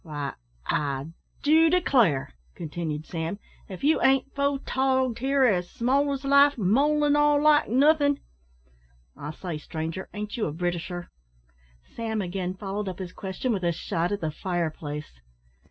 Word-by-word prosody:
"Why 145 -4 -4 0.3
I 140 +1 -1 0.3
do 320 +2 +5
declare," 240 - +2 0.2
continued 155 -1 -4
Sam, 165 +4 -4 0.3
"if 190 +4 -8
you 310 +3 +3
ain't 270 0 +3
photogged 265 -3 0
here 270 +2 +2
as 180 -7 +2
small 275 +4 +1
as 275 0 -4
life, 280 +1 +5
mole 280 +9 +3
an' 290 0 +3
all, 295 0 +4
like 300 0 +4
nothin'. 285 +3 +4 1.0
I 145 - -7
say, 160 0 -5
stranger, 160 +4 -5
ain't 210 +3 -5
you 220 - 0
a - - -3
Britisher?" 175 +1 -3 0.8
Sam 225 -2 -2
again 185 -1 -3
followed 200 +1 -4
up 185 - -7
his 185 -2 -7
question 195 +6 -3
with 195 - -2
a 170 - +2
shot 170 +1 -2
at 205 -1 -2
the 160 - -1
fire 175 0 -2
place. 150 - -7
205 Hz, 155 wpm, -26 LUFS, 170-275 Hz, 1.0 s, do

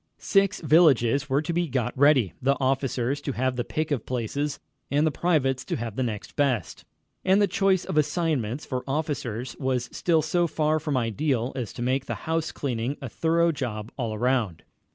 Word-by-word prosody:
Six 195 0 +2
villages 145 -4 +4
were 140 +3 +2
to 170 - -2
be 175 0 +1
got 130 -5 -1
ready, 135 - +4
the 140 +2 +2
officers 135 0 0
to 140 - -3
have 130 +1 0
the 120 - -1
pick 155 +4 -3
of 130 -6 0
places, 130 +4 -2 0.3
and 145 +3 +2
the 155 - +2
privates 135 -7 +1
to - - -2
have 115 -2 -4
next 115 -5 -3
best. 130 - -1 0.4
And 190 +1 +4
the 205 - +5
choice 190 0 +1
of - - -3
assignments 150 -6 -1
for 130 -1 -3
officers 135 -5 -3
was 130 -2 -1
still 165 -3 +1
so 175 -1 +1
far 155 0 +1
from 150 -3 -1
ideal 125 +1 0
as 125 -6 -4
to 120 - -5
make 130 +2 0
the - - -2
house 160 0 -1
cleaning 125 0 -3
a 135 - -6
thorough 165 +5 +2
job 115 -7 -4
all 115 -4 -3
around. 115 -7 0
135 Hz, 185 wpm, -26 LUFS, 125-155 Hz, 0.4 s, the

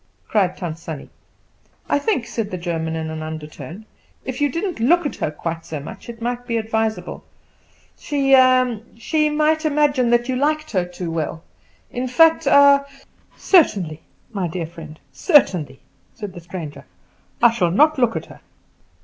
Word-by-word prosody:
cried 190 -4 +1
Tant 165 -3 -5
Sannie. 160 -4 -8 0.8
"I - - +2
think," 315 - 0
said 225 -3 -3
the 185 - -4
German 165 -2 -3
in 160 0 -4
an 160 0 -5
undertone, 155 +4 -8 0.4
"if 260 +2 -5
you 290 - +3
didn't 345 - -3
look 335 +9 +3
at 290 - -3
her - - -1
quite 165 +2 -5
so 155 -2 -6
much 145 +10 -10
it 230 -1 -8
might 245 0 -3
be 230 -2 0
advisable. 220 -4 -2 0.8
She 275 -2 +1
ah 255 -2 +4 0.2
she 305 +6 +1
might 310 +1 +1
imagine 290 -5 +2
that 240 0 +2
you 260 - -1
liked 305 +3 0
her 185 -4 +1
too 180 -1 -6
well, 165 0 -3 0.5
in 250 +1 -3
fact 325 +4 +4
ah 280 0 +6 0.3
" - - -34
"Certainly, 195 - +3 0.3
my 190 -4 -1
dear 170 0 -4
friend, 160 -2 -11
certainly," 180 - +3 0.4
said 205 -4 -7
the 175 - -9
stranger. 165 -3 -8 0.5
"I 240 - +6
shall 185 -7 +1
not 295 - +4
look 240 -2 +2
at - - -3
her." - - -14
225 Hz, 165 wpm, -21 LUFS, 165-280 Hz, 0.8 s, ah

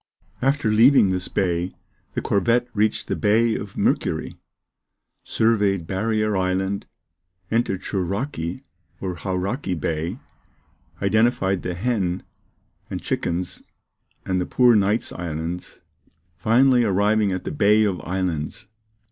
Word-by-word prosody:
After 135 -3 +1
leaving 115 -2 +6
this 90 0 -1
bay, 90 -1 -1 0.4
the - - -3
corvette 115 +5 +2
reached 105 0 +1
the - - -1
Bay 110 +2 +3
of 100 -1 -6
Mercury; - - 0 0.9
surveyed 100 -6 +1
Barrier 105 +3 0
Island, 95 +1 -1 0.6
entered 110 -5 0
Shouraki 95 - -3 0.4
or 95 -2 -3
Hauraki 95 - -2
Bay, 80 +1 -2 0.9
identified 100 -2 +2
the 90 -1 -3
Hen 95 -3 -1 0.7
and - - -4
Chickens 85 +1 -3 0.6
and 95 -1 0
the - - -3
Poor 125 -2 +5
Knights 105 +2 +1
Islands, 85 +1 -5 0.5
finally 125 +5 +4
arriving 105 0 +2
at 95 -1 -3
the - - -4
Bay 105 -5 +4
of 100 -4 0
Islands. 90 -5 -3
100 Hz, 115 wpm, -23 LUFS, 90-110 Hz, 0.9 s, leaving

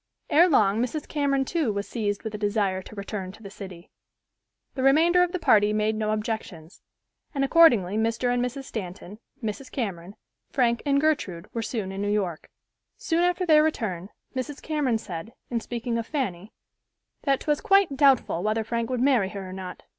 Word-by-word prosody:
Ere 345 +4 +6
long 215 - +3
Mrs. 275 +5 -3
Cameron 280 -2 0
too 310 -6 0
was 200 0 -3
seized 205 -4 -2
with 220 -2 -5
a - - -3
desire 205 -3 0
to 215 - -12
return 200 -2 -5
to 220 - -16
the 200 - -9
city. 185 -4 -10 0.8
The 265 - -4
remainder 320 +7 +5
of 360 -1 +2
the 365 - -1
party 210 - +4
made 215 +1 +1
no 215 0 -1
objections, 215 -6 -4 0.5
and 275 - +1
accordingly 240 - +5
Mr. 230 +2 +1
and 245 0 +1
Mrs. 255 +2 -4
Stanton, 195 -3 -7 0.2
Mrs. 225 +5 -4
Cameron, 195 -6 -4 0.3
Frank 235 -3 +1
and 280 0 +3
Gertrude 210 - -1
were 230 - -2
soon 220 -4 -3
in 195 +1 -5
New 205 - -1
York. 185 -6 -2 0.5
Soon 330 0 0
after 355 +1 +1
their 310 -3 +6
return, 210 - -2 0.3
Mrs. 260 +3 -4
Cameron 290 -7 0
said, 190 +1 -7 0.2
in 235 - 0
speaking 235 0 -3
of 230 - -5
Fanny, 215 - -3 0.7
"that 275 -2 +1
'twas 295 -1 0
quite 395 -8 +4
doubtful 265 - +3
whether 215 +2 0
Frank 230 +1 -2
would 250 -2 -1
marry 250 -8 +3
her 195 -2 -7
or 185 - -8
not. 185 -1 -8
225 Hz, 185 wpm, -26 LUFS, 200-275 Hz, 0.8 s, Ere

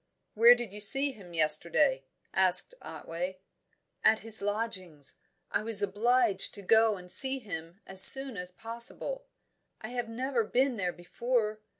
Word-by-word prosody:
"Where 235 +3 +5
did 240 -5 -9
you 210 - -9
see 270 +7 +2
him 180 -8 -15
yesterday?" 160 - +3 0.3
asked - - +1
Otway. 180 +3 -8 0.7
"At 220 0 +2
his 220 -1 0
lodgings. 200 -8 -5 0.4
I - - -2
was 215 -2 +1
obliged 215 +1 0
to 200 - -13
go 220 +1 +1
and 180 -1 -9
see 265 +5 +4
him 175 -6 -10
as 190 0 +4
soon 270 +3 +8
as 180 -1 -8
possible. 235 - -8 0.5
I 220 - -10
have 245 -2 -6
never 250 +1 -3
been 255 +3 -2
there 180 -3 -3
before. 215 +4 -4
220 Hz, 150 wpm, -27 LUFS, 185-245 Hz, 0.7 s, soon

